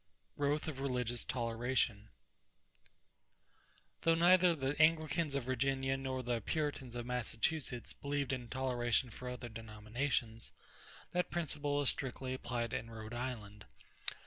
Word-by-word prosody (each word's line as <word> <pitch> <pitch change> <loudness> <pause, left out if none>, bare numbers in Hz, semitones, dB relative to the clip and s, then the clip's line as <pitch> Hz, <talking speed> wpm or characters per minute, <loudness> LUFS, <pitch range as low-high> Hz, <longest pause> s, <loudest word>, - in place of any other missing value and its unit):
=Growth 145 +2 +1
of 145 -4 -3
Religious 125 -3 0
Toleration.= 115 -2 0 1.9
Though 165 0 +5
neither 175 +1 +6
the 135 -1 -1
Anglicans 155 -1 +3
of 140 - 0
Virginia 135 +1 +1
nor 130 -1 -2
the 120 -1 0
Puritans 145 -2 -1
of 120 -1 -3
Massachusetts 125 +2 -1
believed 140 -1 -1
in 125 -2 -3
toleration 125 -2 +1
for 125 +2 -6
other 125 -1 -5
denominations, 115 +2 -2 0.6
that 180 0 +1
principle 145 -4 -1
was 145 -2 +4
strictly 130 -1 -2
applied 120 -2 -2
in 115 - -2
Rhode 110 0 -7
Island. 110 -4 -4
130 Hz, 120 wpm, -36 LUFS, 120-145 Hz, 1.9 s, neither